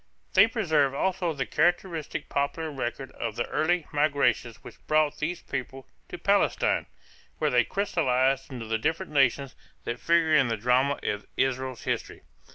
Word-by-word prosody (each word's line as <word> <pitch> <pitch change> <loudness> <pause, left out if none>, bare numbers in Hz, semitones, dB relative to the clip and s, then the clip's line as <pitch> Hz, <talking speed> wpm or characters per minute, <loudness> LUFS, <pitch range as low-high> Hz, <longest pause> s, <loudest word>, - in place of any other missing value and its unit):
They 200 +3 +7
preserve 155 - +1
also 180 +1 0
the 140 -4 -3
characteristic 170 - 0
popular 155 +3 -2
record 135 -1 -4
of 110 - -5
the 120 - -1
early 160 +2 +1
migrations 145 -6 +1
which - - -13
brought 155 -1 +2
these 165 +3 -3
peoples 135 0 -5 0.2
to - - -6
Palestine, - - +1 0.5
where - - 0
they 125 -1 +4
crystalized 135 - 0
into 120 -3 -6
the 110 0 -1
different 160 +7 -2
nations 140 -1 +2 0.3
that 120 +1 -4
figure 165 -2 +3
in 135 -4 +5
the 115 -1 -1
drama 125 +5 +2
of 105 0 -3
Israel's 130 -1 -1
history. - - -3
140 Hz, 155 wpm, -27 LUFS, 130-160 Hz, 0.5 s, They